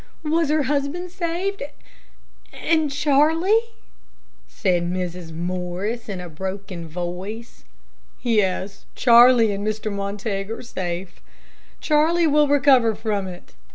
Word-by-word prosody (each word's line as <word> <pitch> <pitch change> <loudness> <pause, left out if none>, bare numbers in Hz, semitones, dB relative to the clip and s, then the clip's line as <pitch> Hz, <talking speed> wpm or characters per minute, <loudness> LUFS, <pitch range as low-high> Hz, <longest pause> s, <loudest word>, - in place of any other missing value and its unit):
Was 320 0 +1
her 305 -1 +2
husband 290 +6 -2
saved, 365 +3 -3 0.9
and 315 -2 +1
Charlie?" 315 +10 +3 0.8
said 175 -3 0
Mrs. 180 -2 -4
Morris, 180 +7 -4
in 195 -2 -4
a 180 - -7
broken 185 +1 -6
voice. 180 +7 -6 0.6
"Yes; 200 -4 0
Charlie 235 -2 +6
and 200 0 -3
Mr. 215 0 -2
Montague 200 0 -3
are - - -10
safe. 180 -5 -5 0.6
Charlie 325 +3 +3
will 300 -1 +4
recover 270 -6 +4
from 210 -3 -2
it. 180 -1 -11
220 Hz, 110 wpm, -22 LUFS, 185-295 Hz, 0.9 s, Charlie